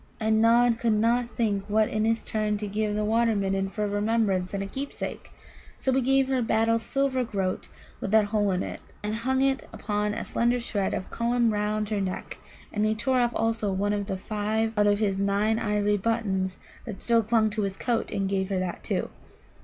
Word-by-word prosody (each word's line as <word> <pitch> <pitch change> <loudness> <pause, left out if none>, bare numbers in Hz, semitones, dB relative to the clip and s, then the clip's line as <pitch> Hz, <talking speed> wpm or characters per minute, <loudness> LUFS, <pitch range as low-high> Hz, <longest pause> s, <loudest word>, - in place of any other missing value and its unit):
And 220 0 +2
Nod 235 +1 +4
could 230 -2 +2
not 235 +3 +2
think 205 -4 +1
what 215 +1 +3
in 215 0 0
his 225 0 +1
turn 215 -1 -1
to 210 0 -4
give 210 +1 -1
the 210 0 0
Water 225 +1 +2
midden 195 -1 0
for 210 +2 -3
a - - +1
remembrance 205 -3 0
and 195 -1 -2
a - - -4
keepsake. 270 +8 -6 0.5
So 265 - 0
he 265 - +3
gave 270 +1 +3
her 265 -1 +1
Battle's 225 0 +2
silver 270 0 0
groat 195 -5 -2 0.3
with - - -3
the 215 0 +5
hole 205 -1 +1
in 185 -1 0
it, - - -6 0.2
and 210 +1 -2
hung 260 +4 0
it 270 0 0
upon 210 0 -2
a - - -4
slender 240 +1 +1
shred 205 -5 -1
of 185 - -6
Cullum 235 -1 +1
round 210 0 -1
her 210 -2 0
neck, 185 -1 -4 0.3
and 210 - 0
he 215 0 +2
tore 255 +3 +1
off 240 0 +1
also 225 -2 0
one 200 +2 0
of 205 -1 -2
the 195 -2 -2
five 215 +3 -1
out 210 -1 +3
of 205 0 +4
his 200 -2 0
nine 205 +3 +1
ivory 210 -1 +1
buttons 195 -3 -1 0.3
that 215 -5 -6
still 230 -1 +4
clung 220 0 +2
to 215 +1 -2
his 195 -1 -2
coat, 235 -2 -1
and 195 -1 -1
gave 190 0 -1
her 195 - 0
that, 185 -1 -4
too. - - -2
215 Hz, 215 wpm, -27 LUFS, 205-230 Hz, 0.5 s, the